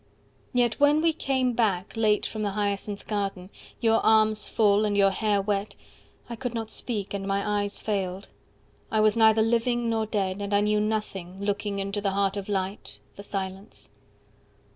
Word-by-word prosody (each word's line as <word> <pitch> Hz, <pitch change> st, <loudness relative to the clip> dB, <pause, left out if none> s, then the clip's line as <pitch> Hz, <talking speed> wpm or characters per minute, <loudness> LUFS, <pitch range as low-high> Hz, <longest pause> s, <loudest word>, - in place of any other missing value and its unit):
—Yet 245 Hz, -2 st, +1 dB
when 290 Hz, +1 st, +5 dB
we 330 Hz, -1 st, +3 dB
came 260 Hz, -4 st, 0 dB
back, 200 Hz, -6 st, 0 dB
late, 215 Hz, -2 st, +2 dB
from 215 Hz, -, -4 dB
the 205 Hz, -2 st, -1 dB
Hyacinth 205 Hz, 0 st, -2 dB
garden, 195 Hz, -3 st, -3 dB, 0.3 s
Your 225 Hz, -1 st, +2 dB
arms 215 Hz, -1 st, +3 dB
full, 210 Hz, -1 st, +3 dB
and 205 Hz, -1 st, 0 dB
your 195 Hz, -1 st, +5 dB
hair 210 Hz, 0 st, +1 dB
wet, 205 Hz, 0 st, -2 dB, 0.5 s
I 235 Hz, -, -6 dB
could 245 Hz, 0 st, -4 dB
not 225 Hz, -1 st, -4 dB
Speak, 210 Hz, -4 st, -3 dB
and 195 Hz, -1 st, -4 dB
my 200 Hz, +1 st, 0 dB
eyes 205 Hz, 0 st, -2 dB
failed, 195 Hz, -3 st, -3 dB, 0.6 s
I 220 Hz, -, +1 dB
was 215 Hz, 0 st, +4 dB
neither 220 Hz, -1 st, +5 dB
Living 235 Hz, +1 st, +1 dB
nor 220 Hz, -1 st, 0 dB
dead, 200 Hz, -2 st, -2 dB
and 200 Hz, 0 st, -1 dB
I 205 Hz, -, +4 dB
knew 210 Hz, 0 st, +2 dB
nothing, 210 Hz, -4 st, -2 dB
40 195 Hz, +1 st, -7 dB
Looking 205 Hz, 0 st, -2 dB
into 200 Hz, +1 st, -3 dB
the 200 Hz, -1 st, -1 dB
heart 195 Hz, 0 st, +1 dB
of 200 Hz, 0 st, -5 dB
light, 195 Hz, 0 st, -3 dB, 0.2 s
the -, -, -9 dB
silence. 195 Hz, 0 st, -6 dB
210 Hz, 180 wpm, -26 LUFS, 200-220 Hz, 0.6 s, when